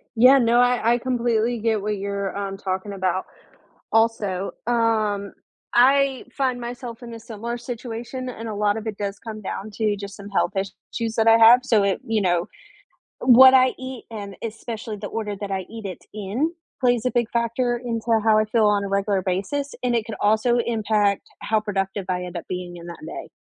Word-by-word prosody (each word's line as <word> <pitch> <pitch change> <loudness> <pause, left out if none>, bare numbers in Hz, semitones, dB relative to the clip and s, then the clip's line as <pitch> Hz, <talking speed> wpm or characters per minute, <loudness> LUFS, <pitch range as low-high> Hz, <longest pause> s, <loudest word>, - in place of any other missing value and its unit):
Yeah, 250 +4 +7
no, 240 -1 +4
I 245 -2 +3
I - - +2
completely 240 -2 0
get 220 -1 0
what 210 +1 -2
you're, 200 0 -3
um, 195 -1 -4
talking 190 +1 -3
about. 185 -1 -1 0.7
Also, 210 -4 +1 0.2
um, 215 -4 +1 0.4
I 270 +1 +4
find 260 -3 0
myself 240 -1 -7
in 235 -1 -8
a 230 - -8
similar 230 +1 -5
situation 240 +1 -6
and 230 -2 -7
a 215 - -4
lot 205 +1 +1
of 220 - -6
it 215 -2 -4
does 200 -1 -3
come 220 -2 -8
down 205 +1 -5
to 210 0 0
just 200 0 -7
some 200 0 -10
health 200 +1 0
issues 220 +3 -4
that 225 0 +2
I 225 - +8
have. 230 +2 +8
So, 225 -5 +3
it 195 -1 +1
you 225 -1 0
know, 175 -2 +1 0.7
what 260 +1 +8
I 255 -1 +5
eat 260 -1 -7
and 200 -3 -7
especially 225 -1 -5
the 205 0 -6
order 210 -2 -4
that 205 -1 -4
I 190 -1 -3
eat 225 -2 -8
it 185 -3 -6
in 215 - -2 0.3
plays 245 -2 +2
a - - +2
big 235 -2 0
factor 235 +1 0
into 230 -2 -3 0.2
how 220 -1 +5
I 215 - +3
feel 220 0 +2
on 205 -1 +2
a - - -3
regular 195 0 0
basis 200 +11 -2
and 245 -1 +1
it 225 - 0
could 220 0 -6
also 220 +3 +3
impact 215 -3 +1 0.2
how 220 0 +1
productive 195 -1 -2
I 180 -1 -1
end 180 0 -7
up 170 - -5
being 180 -1 -5
in 170 0 -10
that 170 - -8
day, - - -7
220 Hz, 200 wpm, -23 LUFS, 200-240 Hz, 0.7 s, I